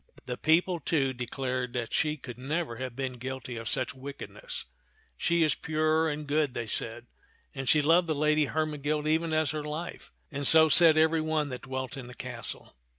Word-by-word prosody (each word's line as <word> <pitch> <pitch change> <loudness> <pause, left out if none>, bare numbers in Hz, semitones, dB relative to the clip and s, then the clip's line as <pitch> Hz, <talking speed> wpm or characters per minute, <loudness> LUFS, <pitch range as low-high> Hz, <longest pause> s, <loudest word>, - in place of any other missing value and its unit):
The 125 - -3
people, 170 +5 +2
too, 140 -4 0
declared 125 0 -3
that 120 -2 -3
she 155 -1 +1
could 125 -3 -9
never 145 -2 -2
have 130 -1 -5
been 130 -2 -4
guilty 130 0 -5
of 115 -1 -4
such - - -1
wickedness. 140 - -6 0.2
" 440 +1 -35
She 170 -1 +2
is 155 - +3
pure 155 +1 +1
and 150 0 -4
good," 145 -2 0
they 120 - -2
said, 115 +2 -1 0.5
"and 135 -1 -3
she 150 -1 +4
loved 170 +3 +4
the 155 - 0
Lady 150 +1 +3
Hermegild 150 0 -1
even 160 +1 +1
as 155 -1 +1
her 155 -1 -3
life"; 155 +3 -6 0.2
and 145 -2 -1
so 160 0 +7
said 160 0 +7
every 160 0 +4
one 155 -2 0
that 125 -1 -6
dwelt 130 0 -5
in 125 -3 -7
the 125 - -11
castle. 120 -3 -5
150 Hz, 195 wpm, -29 LUFS, 130-155 Hz, 0.5 s, so